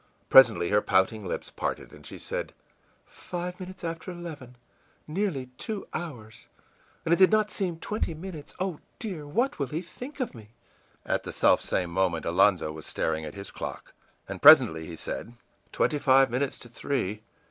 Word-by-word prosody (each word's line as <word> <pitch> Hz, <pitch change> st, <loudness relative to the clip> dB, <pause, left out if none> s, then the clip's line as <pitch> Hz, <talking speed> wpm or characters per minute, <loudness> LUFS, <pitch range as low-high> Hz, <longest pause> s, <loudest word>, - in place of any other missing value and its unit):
Presently 115 Hz, -10 st, +7 dB
her 105 Hz, 0 st, +4 dB
pouting 105 Hz, +3 st, +2 dB
lips -, -, -4 dB
parted, -, -, -4 dB
and -, -, -14 dB
she -, -, -8 dB
said: -, -, -5 dB, 0.5 s
ìFive 180 Hz, 0 st, -6 dB
minutes 185 Hz, 0 st, -9 dB
after 165 Hz, +2 st, -4 dB
eleven! 160 Hz, -8 st, -8 dB, 0.5 s
Nearly 155 Hz, -7 st, -2 dB
two 215 Hz, -3 st, -4 dB
hours, 120 Hz, -10 st, -7 dB, 0.6 s
and 165 Hz, -, +3 dB
it -, -, +4 dB
did 190 Hz, +1 st, +6 dB
not 215 Hz, -1 st, +3 dB
seem 180 Hz, -5 st, -2 dB
twenty 170 Hz, -1 st, -3 dB
minutes! 160 Hz, -2 st, -9 dB
Oh, 185 Hz, -4 st, -2 dB, 0.2 s
dear, 180 Hz, -10 st, -6 dB
what 240 Hz, -, 0 dB
will 140 Hz, -, 0 dB
he 155 Hz, +7 st, -4 dB
think 250 Hz, -, -9 dB
of 255 Hz, -, -2 dB
me!î 110 Hz, -4 st, -12 dB, 0.6 s
At -, -, 0 dB
the -, -, -7 dB
self -, -, +4 dB
same 90 Hz, -2 st, -1 dB
moment 90 Hz, -2 st, 0 dB
Alonzo 90 Hz, -2 st, +3 dB
was 80 Hz, -1 st, -7 dB
staring 80 Hz, -1 st, -1 dB
at 75 Hz, -, -8 dB
his 100 Hz, 0 st, -7 dB
clock. -, -, -7 dB, 0.3 s
And -, -, -7 dB
presently 80 Hz, -1 st, +8 dB
he 85 Hz, -, -7 dB
said: 115 Hz, +8 st, -5 dB, 0.4 s
ìTwenty 150 Hz, -, +1 dB
five 135 Hz, -2 st, +5 dB
minutes 130 Hz, +2 st, -1 dB
to 120 Hz, -, -11 dB
three! 115 Hz, -4 st, -2 dB
140 Hz, 170 wpm, -27 LUFS, -, 0.6 s, presently